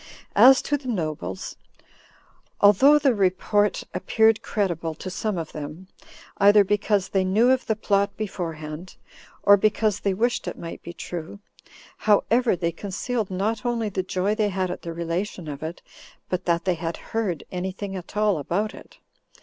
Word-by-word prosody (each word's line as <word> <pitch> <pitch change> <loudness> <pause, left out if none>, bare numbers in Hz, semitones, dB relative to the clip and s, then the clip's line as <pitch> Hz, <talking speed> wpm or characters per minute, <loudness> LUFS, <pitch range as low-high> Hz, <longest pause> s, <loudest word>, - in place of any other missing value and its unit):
As 265 +1 +7
to 290 - 0
the 270 -2 -11
nobles, 155 - -4 1.0
although 260 +9 +6
the 275 -3 +3
report 205 +1 +1
appeared 220 0 +2
credible 170 -6 -2
to 185 +4 -7
some 210 +1 -2
of 165 -2 -5
them, 155 +5 -8 0.5
either 205 +1 +7
because 205 -1 0
they 190 -1 +1
knew 215 +7 +3
of 260 -1 +1
the 220 - +1
plot 200 -1 0
beforehand, 165 -4 -5 0.5
or 200 0 +7
because 210 0 +1
they 195 -2 0
wished 240 +4 0
it - - -4
might 165 - -8
be 170 - -8
true; 170 +2 -7 0.6
however, 225 +2 +3
they 170 -1 -1
concealed 205 +5 -3
not 205 +5 -2
only 235 -3 -1
the 190 -1 -2
joy 185 +2 -1
they 215 -1 +1
had 185 -2 -1
at - - -6
the 170 - -6
relation 170 +1 -4
of 145 -1 -6
it, 160 +2 -6 0.5
but 185 0 -2
that 170 -1 +1
they 185 - +2
had 165 0 -4 0.2
heard 200 -9 -1
any 185 +1 -3
thing 195 +1 -6
at 185 +2 -8
all 210 -5 +2
about 200 +9 -2
it. - - -14
195 Hz, 165 wpm, -24 LUFS, 170-215 Hz, 1.0 s, As